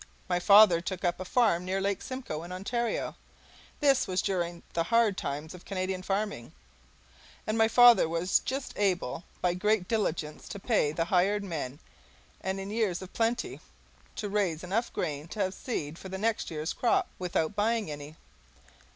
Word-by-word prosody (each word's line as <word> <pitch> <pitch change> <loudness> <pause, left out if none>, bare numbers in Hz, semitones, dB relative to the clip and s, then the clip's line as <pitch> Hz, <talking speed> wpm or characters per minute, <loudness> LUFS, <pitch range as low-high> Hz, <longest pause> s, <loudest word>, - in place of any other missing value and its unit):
My 180 -1 +1
father 200 -2 +7
took 185 +1 -4
up 175 - 0
a 185 - -5
farm 205 -5 +2
near 190 +1 -1
Lake 200 0 -1
Simcoe, 255 -12 -5
in 175 +2 -9
Ontario. 230 +6 -2 0.7
This 275 -3 +4
was 185 -1 0
during 175 -3 -2
the 165 0 0
hard 230 -1 +3
times 150 0 -4
of 180 - -12
Canadian 185 -1 -3
farming, 195 - -3 0.9
and 215 - -1
my 225 0 +4
father 240 -5 +7
was 170 +3 +2
just 265 +1 -4
able 180 -6 0 0.2
by 180 -1 +2
great 195 +1 +1
diligence 160 -9 -2
to 200 - -6
pay 205 -8 +2
the 165 +2 -1
hired 195 +4 +2
men 150 -8 -4 0.7
and, 190 +1 -2
in 195 +1 -5
years 210 -5 0
of 185 - -11
plenty, 230 +1 -1 0.6
to 210 - -3
raise 195 -6 0
enough 215 +7 -1
grain 150 0 -3
to 210 - -8
have 185 0 -2
seed 165 - -4
for 190 - -8
the 190 - -4
next 220 +2 -1
year's 155 0 -3
crop 380 -1 +2
without 180 0 -1
buying 215 -3 +1
any. 145 +1 -8
190 Hz, 170 wpm, -29 LUFS, 170-215 Hz, 0.9 s, father